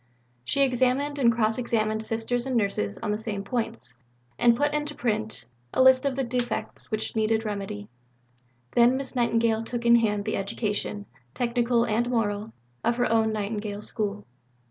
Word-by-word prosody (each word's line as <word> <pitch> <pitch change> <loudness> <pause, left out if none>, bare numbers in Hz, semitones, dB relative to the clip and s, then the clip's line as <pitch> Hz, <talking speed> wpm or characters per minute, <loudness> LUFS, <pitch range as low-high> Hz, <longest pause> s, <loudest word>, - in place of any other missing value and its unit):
She 275 - +2
examined 265 +3 +1
and 235 -3 +5
cross 225 0 +1
examined 220 -2 0
Sisters 230 +3 0
and 255 -2 +1
Nurses 150 - 0
on 215 - 0
the 210 - -1
same 210 -3 -4
points, 195 - -3 0.5
and 235 -1 +5
put 290 +2 +1
into 295 0 -2
print 220 -2 -1 0.3
a 260 - +5
list 260 +1 +6
of 270 - -1
the 270 - 0
defects 245 0 -2
which 215 0 -2
needed 220 0 +1
remedy. 195 - -4 0.8
Then 240 +2 +4
Miss 270 0 -5
Nightingale 230 -2 +2
took 235 +1 -4
in 235 0 +7
hand 210 -3 0
the 215 - -1
education, 205 0 -3 0.3
technical 240 -1 +1
and 235 +3 0
moral, 215 -2 -1 0.3
of 235 - +2
her 245 -1 +1
own 225 -1 +3
Nightingale 210 -1 -3
School. 210 -2 -2
230 Hz, 165 wpm, -26 LUFS, 210-245 Hz, 0.8 s, in